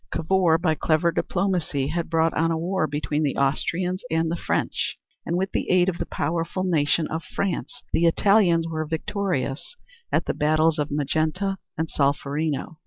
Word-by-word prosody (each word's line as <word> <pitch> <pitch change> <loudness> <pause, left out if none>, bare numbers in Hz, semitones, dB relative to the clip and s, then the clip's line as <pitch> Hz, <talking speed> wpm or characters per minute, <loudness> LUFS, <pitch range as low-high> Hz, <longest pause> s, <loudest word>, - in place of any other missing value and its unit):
Cavour, 170 -1 +2
by 165 -1 +1
clever 160 +2 +2
diplomacy, 170 -6 -1
had 170 +1 -2
brought 165 0 +2
on 165 +1 +1
a 165 - 0
war 175 0 0
between 150 0 -2
the 145 -3 0
Austrians 175 +7 0
and 160 0 +1
the - - 0
French - - -1 0.3
and 170 - 0
with 190 +1 -1
the - - -2
aid 180 0 +4
of 175 - -4
the - - -3
powerful 165 +4 -2
nation 160 -3 +2
of 160 +1 -3
France 195 -2 -3
the 170 +1 +4
Italians 175 -2 +4
were 160 -1 -2
victorious 160 - -3 0.4
at - - +1
the - - -1
battles 155 +1 +2
of 150 - -1
Magenta 155 +7 -1 0.2
and 160 - -1
Solferino. 145 +2 -1
165 Hz, 170 wpm, -24 LUFS, 155-180 Hz, 0.4 s, aid